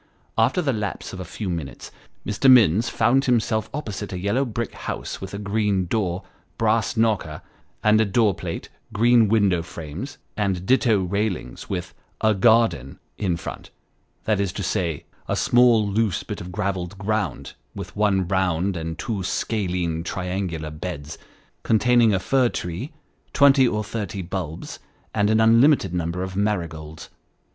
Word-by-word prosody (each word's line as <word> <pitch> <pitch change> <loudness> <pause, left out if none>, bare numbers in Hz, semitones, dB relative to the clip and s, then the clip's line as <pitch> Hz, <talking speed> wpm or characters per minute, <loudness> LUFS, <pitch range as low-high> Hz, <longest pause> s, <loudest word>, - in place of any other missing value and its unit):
After 120 +11 +2
the 135 -3 +1
lapse 105 -3 -4
of 95 - -7
a - - -4
few 105 +4 -6
minutes, 85 -6 -5 0.3
Mr. 105 +7 +2
Minns 115 -3 +6
found 130 +5 +2
himself 110 -3 +1
opposite 105 -8 -5
a 90 - -4
yellow 100 +9 0
brick 115 -1 -4
house - - -5
with 95 0 -6
a - - -4
green 100 -2 0
door, 90 -2 -1 0.3
brass 115 +1 +1
knocker, 105 -9 0 0.4
and 110 -1 +4
door 105 -1 +3
plate, - - -6 0.2
green 115 +1 +4
window 100 -5 +3
frames 85 - -7 0.2
and 95 -4 -1
ditto 115 -5 +3
railings, 95 - -3
with - - -4 0.2
" - - -29
a - - +4
garden 110 - +3
" - - -44
in 85 - +1
front, - - -8 0.5
that 105 -3 +1
is 100 -2 0
to 100 - -4
say, 85 -4 -2 0.2
a - - 0
small 120 -3 +4
loose 100 -4 0
bit - - -6
of 90 +1 -8
gravelled 95 -1 -3
ground, 105 +2 -2 0.2
with - - -7
one 100 -3 +2
round 95 0 0
and 80 0 -4
two 105 -1 -3
scalene 90 -4 -1
triangular 90 -4 -3
beds, 75 -1 -6 0.4
containing 120 0 +4
a 100 - +2
fir 130 +3 +2
tree, 90 - -5 0.4
twenty 135 -2 +6
or 105 -2 -1
thirty 100 -3 -4
bulbs, 85 -3 -5 0.3
and 105 -1 +2
an 110 0 +3
unlimited 115 - +5
number 85 +1 -2
of 95 0 -6
marigolds. 85 -7 -3
100 Hz, 155 wpm, -23 LUFS, 90-110 Hz, 0.5 s, Minns